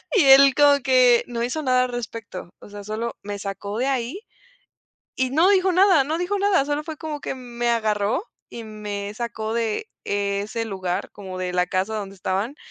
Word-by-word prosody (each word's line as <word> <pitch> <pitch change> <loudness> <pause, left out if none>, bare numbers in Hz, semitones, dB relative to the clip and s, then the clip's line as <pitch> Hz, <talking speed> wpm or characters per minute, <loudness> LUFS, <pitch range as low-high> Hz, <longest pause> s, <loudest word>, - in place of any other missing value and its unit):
y 395 - +5
él 270 0 +8
como 290 -1 +5
que, 250 -2 +5
no 235 -1 -3
hizo 250 +6 -2
nada 255 -2 +3
al - - -5
respecto, 230 -6 -6
o - - -14
sea, 205 0 -9
solo 220 +3 -4
me 205 0 -5
sacó 200 +1 -5
de 260 - 0
ahí 265 - -2 0.9
y 260 0 0
no 330 +6 +4
dijo 380 -1 +3
nada, 370 -4 +5
no 315 +3 -1
dijo 365 +4 -1
nada. 390 -8 +3
Solo 295 +1 -2
fue 315 0 -7
como 305 -1 -5
que - - -4
me 240 -2 -3
agarró 215 - 0 0.3
y 235 - -8
me 205 -1 -6
sacó 220 -1 -4
de 230 - -1 0.2
ese 200 +3 -2
lugar, 185 -4 -3
como 190 -2 -8
de 180 -1 -3
la 180 0 +1
casa 195 +4 -1
donde 200 -2 -5
estaban, 195 +7 -2
235 Hz, 195 wpm, -23 LUFS, 205-275 Hz, 0.9 s, él